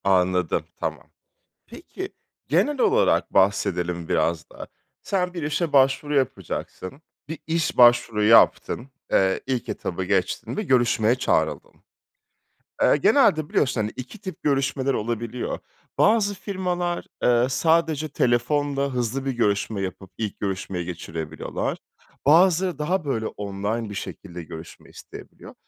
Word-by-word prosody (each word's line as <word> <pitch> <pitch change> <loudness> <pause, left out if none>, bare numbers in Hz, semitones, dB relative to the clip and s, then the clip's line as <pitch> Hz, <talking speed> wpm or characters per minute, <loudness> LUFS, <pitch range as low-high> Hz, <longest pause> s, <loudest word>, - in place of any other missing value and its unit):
Anladım, 90 -2 +2 0.2
tamam. - - -5 0.6
Peki, - - -8 0.4
genel 255 - +1
olarak 450 +4 +2
bahsedelim 90 -3 +1
biraz 85 -2 0
daha. - - -9 0.4
Sen 180 -2 -1
bir 170 - -4
işe 150 +2 -1
başvuru 135 +2 +3
yapacaksın, 135 -1 -3 0.3
bir 160 0 -5
iş 165 +1 -1
başvuru 120 -3 +5
yaptın. 115 +3 +4 0.2
Eee, 95 0 +3
ilk 130 -2 -2
etabı 95 +1 -3
geçtin 95 -1 -1
ve 215 - -1
görüşmeye 120 - +3
çağrıldın. 125 - 0 1.1
Eee, - - +5
genelde 155 - +3
biliyorsun, 130 -5 +1
hani, 105 +1 -2
2 130 - -8
tip 185 -6 -8
görüşmeler 135 -1 +1
olabiliyor. 120 +1 -3 0.4
Bazı 210 -1 +3
firmalar, 180 -3 -3 0.2
eee, 120 0 +4
sadece 160 +1 +1
telefonla 140 +2 0
hızlı 125 +2 -2
bir 135 - 0
görüşme 105 -3 0
yapıp 95 0 -6
ilk 110 -3 -4
görüşmeyi 95 -2 -3
geçirebiliyorlar. 80 -2 -4 0.5
Bazıları 175 +2 +4
daha, 165 +3 -1
böyle, 115 -6 -1
online 105 +3 -4
bir 105 - -7
şekilde 90 -3 -7
görüşme 80 +1 -11
isteyebiliyor. - - -12
125 Hz, 120 wpm, -24 LUFS, 100-155 Hz, 1.1 s, başvuru